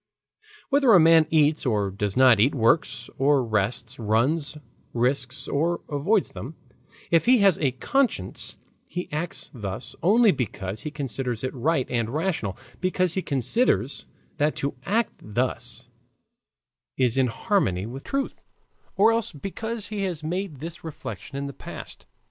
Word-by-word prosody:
Whether 275 -5 +5
a - - +8
man 160 -1 +6
eats 155 -1 +3
or 105 -6 0
does 100 +1 -3
not 130 -4 +6
eat, 130 +8 +3
works 120 0 +1
or 135 -1 +3
rests, 115 +4 -2
runs 130 +9 +1 0.4
risks 125 +2 0
or 165 +4 0
avoids 170 +8 +1
them, 140 +8 -8 0.6
if 165 +5 +3
he 255 +1 +7
has 195 -4 +5
a 135 -5 +1
conscience 170 - -1 0.3
he 180 +2 -5
acts 155 +4 -3
thus 105 -2 -6
only 215 +4 +5
because 105 - -3
he 155 - -4
considers 135 -5 -3
it 130 - -2
right 135 +1 +1
and 115 -2 0
rational, 155 - -2 0.2
because 185 -1 +1
he 190 - -1
considers 140 - +1 0.3
that 150 +1 +1
to 140 - -2
act 225 +4 +1
thus 120 +5 -2 1.1
is 125 -3 +3
in 130 -1 +3
harmony 115 - 0
with 130 +5 -7
truth, 275 0 -3 0.5
or 210 +4 +5
else 230 -1 0
because 210 +7 -5
he 210 -2 -3
has 175 -5 -3
made 170 -3 -3
this 165 +1 -7
reflection 145 -3 -7
in 140 - -3
the 140 - -6
past. - - -10
145 Hz, 150 wpm, -25 LUFS, 120-180 Hz, 1.1 s, a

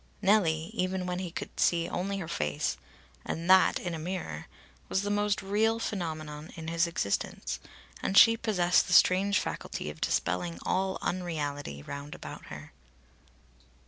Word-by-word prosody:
Nellie, 180 -6 +2
even 185 0 -1
when 180 0 -2
he 185 -2 -3
could 165 - -7
see 170 -1 +3
only 195 +2 -2
her 180 -4 -5
face, 75 - -1 0.5
and 165 +1 -4
that 190 0 +6
in 175 - -4
a 165 - -4
mirror, 160 - -5 0.4
was 190 - +1
the 205 - -1
most 205 0 +1
real 215 +3 +2
phenomenon 155 -7 -4
in 160 0 -6
his 170 +1 +2
existence, 100 -12 -2 0.4
and 195 - 0
she 230 0 +9
possessed 185 -6 +2
the 180 - -1
strange 190 +3 +5
faculty 75 - -4
of 75 - -15
dispelling 90 -1 0
all 190 0 0
unreality, 145 - -3
round 140 - -7
about - - -9
her. - - -9
175 Hz, 150 wpm, -29 LUFS, 155-195 Hz, 0.5 s, she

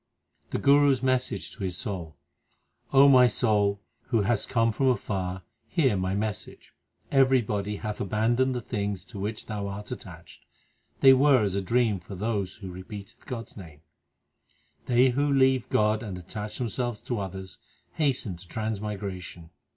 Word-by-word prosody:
The - - -2
Guru 145 0 +5
s 130 -1 -4
message 130 -1 0
to 105 - -8
his 90 -2 -1
soul: 90 - -4 0.8
O 140 +1 +7
my 130 -2 +7
soul, 105 -3 +1 0.3
who 115 -4 +2
hast 105 +2 0
come 115 -2 +2
from 135 +5 0
afar, 95 -7 -1 0.2
Hear 140 - +2
my 95 0 -1
message. 105 -1 -5 0.4
Everybody 120 -7 +2
hath 105 0 -5
abandoned 120 +6 +1
the 125 - -2
things 100 -4 -3
To 100 - -9
which 105 +2 -4
thou 105 -2 -4
art 100 +1 -7
attached. - - -10 0.6
They 135 -1 +9
were 130 -2 +5
as 100 -3 0
a 100 - 0
dream 115 0 +1
for 95 +3 -9
those 100 -1 -2
Who 95 -3 -8
repeated 100 +2 -10
God 120 -4 -5
s - - -17
name. 80 -7 -11 1.1
They 125 +1 +5
who 140 +3 +1
leave 130 -2 +3
God 105 0 +2
and 100 -6 -6
attach 105 +4 -6
themselves 120 -1 -2
to 120 -3 -3
others 95 -2 -7 0.3
Hasten 130 - 0
to 90 +2 -12
transmigration. 100 -5 -5
105 Hz, 160 wpm, -27 LUFS, 100-125 Hz, 1.1 s, They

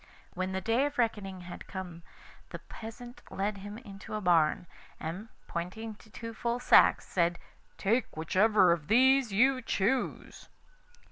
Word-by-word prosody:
When 185 +1 -3
the 190 0 -2
day 235 +8 +2
of 290 - -8
reckoning 205 -6 -1
had 175 0 -9
come 180 -3 -7 0.5
the - - -6
peasant 240 +2 -10
led 200 +1 -2
him 205 +2 -8
into 200 -3 -9
a - - -1
barn, 175 -4 +3 0.3
and 185 +8 -6 0.2
pointing 205 +6 -5
to 220 - -19
two 230 +1 -8
full 235 +2 -2
sacks, - - +5
said: 170 -1 +1 0.4
'Take 225 -2 0
whichever 190 +3 +4
of 160 -3 -1
these 260 +2 +4
you 255 +6 +3
choose. 230 +3 -2
210 Hz, 145 wpm, -30 LUFS, 185-230 Hz, 0.5 s, sacks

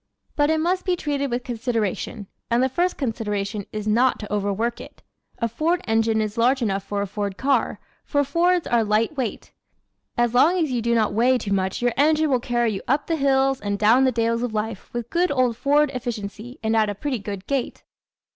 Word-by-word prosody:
But 290 -1 +2
it 315 - +2
must 360 +3 0
be 365 -2 +1
treated 285 -4 -2
with 245 +1 -2
consideration 230 -3 -2 0.2
and 240 +2 +3
the 260 - +2
first 350 +7 0
consideration 210 -5 -3
is 215 0 -5
not 240 +4 +3
to 210 -1 -7
overwork 210 +3 -1
it. - - -13 0.3
A 230 - 0
Ford 315 +10 0
engine 225 0 +2
is 215 +1 -3
large 250 +2 +3
enough 195 -3 -1
for 200 0 -2
a - - -2
Ford 200 0 -4
car, 275 +1 +1 0.2
for 285 -1 +1
Fords 345 +5 +2
are 235 -1 +2
light 215 +6 +1
weight. 255 -6 -4 0.7
As 240 -1 +2
long 315 +9 +4
as 315 -6 0
you 245 -2 0
do 235 +1 +1
not 215 -3 +2
weigh 245 +4 +3
too 200 -5 -3
much 190 +3 -1
your 245 -1 +2
engine 305 +1 +3
will 255 - +3
carry 240 -1 0
you 195 - -4
up 280 +3 +1
the 330 - 0
hills 270 -2 +2
and 205 0 -2
down 220 +6 +5
the 260 - +3
dales 230 0 0
of 240 -3 -3
life 215 -1 -4
with 240 -1 -5
good 355 +2 +2
old 255 -4 +1
Ford 290 +3 +2
efficiency 235 -1 -5
and 220 0 +1
at 215 -1 +3
a 205 - -3
pretty 260 +3 -3
good 200 -2 -6
gait. 275 -3 -2
240 Hz, 210 wpm, -23 LUFS, 215-275 Hz, 0.7 s, down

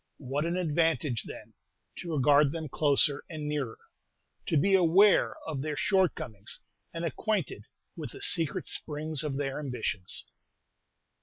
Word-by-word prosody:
What 140 +3 -2
an 170 +2 -1
advantage, 160 -7 +1
then, - - -10 0.4
to 170 -3 -4
regard 145 +1 +5
them 160 -2 -5
closer 145 0 +2
and 155 -2 -5
nearer, 145 -6 -2 0.7
to 160 - +2
be 195 +7 +3
aware 190 +3 +5
of 150 -4 -3
their 150 +1 -3
shortcomings, 180 - 0 0.3
and 170 0 -4
acquainted 215 +5 -2 0.3
with - - -7
the 400 - -10
secret 175 - +1
springs 155 -1 0
of 145 -3 -2
their 135 0 -2
ambitions! 125 -9 -3
150 Hz, 135 wpm, -29 LUFS, 140-170 Hz, 0.7 s, regard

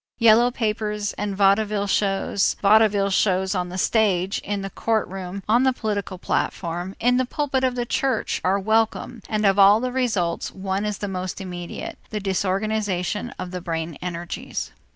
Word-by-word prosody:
Yellow 230 +1 +6
papers 210 -3 -2
and 205 -1 -4
vaudeville 205 +1 +3
shows 195 -1 +1
vaudeville 205 -1 +4
shows 190 0 +2
on 180 -2 -2
the 180 - -6
stage, 195 -2 +1
in 200 0 -3
the 195 - -5
courtroom, 195 -4 -2
on 230 +3 +4
the 260 0 +3
political 205 -5 -3
platform, 175 +1 -2
in 245 +1 +3
the 255 - +2
pulpit 270 0 -1
of 255 -1 +1
the 240 -1 -1
church 265 +2 -1
are 190 +2 +2
welcome, 220 +3 0
and 215 -1 0
of 195 0 +4
all 200 +2 +7
the 250 +1 -2
results, 215 -10 -1
one 195 +1 -3
is 210 -2 -2
the 205 - -4
most 185 -1 -4
immediate, 180 -2 -6
the 215 - -3
disorganization 200 +2 -1
of 180 -1 -6
the 180 -1 -5
brain 165 -2 -3
energies. 175 -1 -5
200 Hz, 165 wpm, -23 LUFS, 185-220 Hz, -, all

